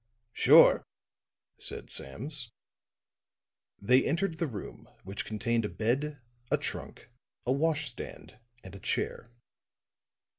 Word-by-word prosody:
"Sure," - - +7 0.8
said - - -1
Sams. 120 - -2 1.3
They 125 +6 +4
entered 170 +2 0
the 165 - +1
room, 105 -8 -8
which 95 +2 -5
contained 115 +1 0
a 105 - -2
bed, 135 +7 -1 0.3
a - - +3
trunk, - - -6 0.3
a 125 - +1
wash 150 0 +1
stand, 120 - -10 0.2
and 95 - -10
a 100 - -9
chair. 115 - -2
125 Hz, 110 wpm, -30 LUFS, 105-150 Hz, 1.3 s, Sure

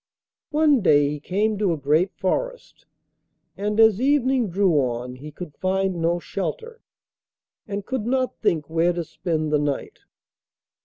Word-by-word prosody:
One 300 -4 +3
day 145 -6 +4
he 150 0 -4
came 205 +6 -1
to 195 -5 +2
a - - -3
great 155 +7 +2
forest, - - -3 0.7
and 210 +2 -2
as 220 -1 +5
evening 265 -4 +2
drew 190 0 +2
on 125 -1 -3
he 150 +4 -9
could 155 0 -9
find 190 -2 0
no 170 +1 +2
shelter, 450 - -5 0.9
and 200 -1 -4
could 245 -3 -3
not 255 0 -1
think 155 -3 0
where 165 +2 +1
to 170 0 -3
spend 155 -1 -3
the 150 - +4
night. 145 -2 -3
185 Hz, 150 wpm, -23 LUFS, 155-225 Hz, 0.9 s, as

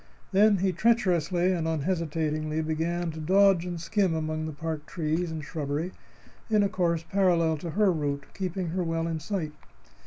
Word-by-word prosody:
Then 205 +1 +5
he 190 +1 +1
treacherously 185 -4 +2
and 165 -3 -1
unhesitatingly 160 -1 -1
began 165 +2 -1
to 160 - -8
dodge 190 +2 +4
and 175 -1 -4
skim 185 0 +1
among 155 0 -2
the - - -4
park 155 0 -5
trees 165 +1 -1
and 160 -2 -5
shrubbery 150 +3 -3 0.6
in 215 -2 +4
a 200 - +2
course 170 -3 0
parallel 175 -5 +3
to 170 +3 -6
her 200 +3 +3
route, 145 -3 -2
keeping 185 -2 -3
her 180 +2 -1
well 165 -1 -1
in 165 -1 -2
sight. 165 -1 -3
165 Hz, 165 wpm, -27 LUFS, 155-185 Hz, 0.6 s, Then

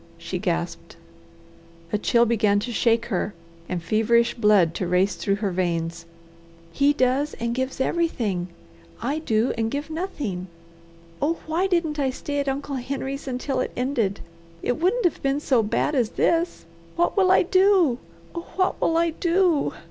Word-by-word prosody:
she - - -5
gasped. - - -3 1.0
A - - +3
chill 235 +3 +3
began 215 -3 +2
to 245 - -4
shake 230 0 +2
her 190 +2 -1 0.3
and 180 -2 -3
feverish 235 +4 +2
blood 210 -7 +4
to 180 - -3
race 180 +2 +2
through 195 - -1
her 200 -1 -2
veins. 170 -2 -2 0.7
"He 280 +1 +4
does 275 +2 +1
and 235 0 -2
gives 260 +2 -3
everything; 235 - 0 0.5
I 280 +7 -1
do 225 -5 +1
and 225 0 +1
give 290 +5 -4
nothing! 285 - -4 0.7
Oh 320 +4 +1
why 335 +5 0
didn't 335 -5 0
I 270 -2 +2
stay 285 +2 -3
at 280 -1 0
Uncle 280 0 -3
Henry's 270 +2 -4
until 260 +1 -2
it - - -1
ended? 245 -6 -1 0.4
It 245 - 0
wouldn't 410 +7 +2
have 350 - +1
been 275 +1 +1
so 260 -5 +2
bad 220 +7 0
as 245 -6 +2
this. 335 +1 0 0.3
What 345 +1 +1
will 385 -3 +4
I 375 - +5
do? 370 -8 +4 0.3
Oh 340 0 -6
what 370 0 +1
will 325 - +2
I 335 0 +2
do? 340 -1 +2
260 Hz, 165 wpm, -24 LUFS, 215-320 Hz, 1.0 s, I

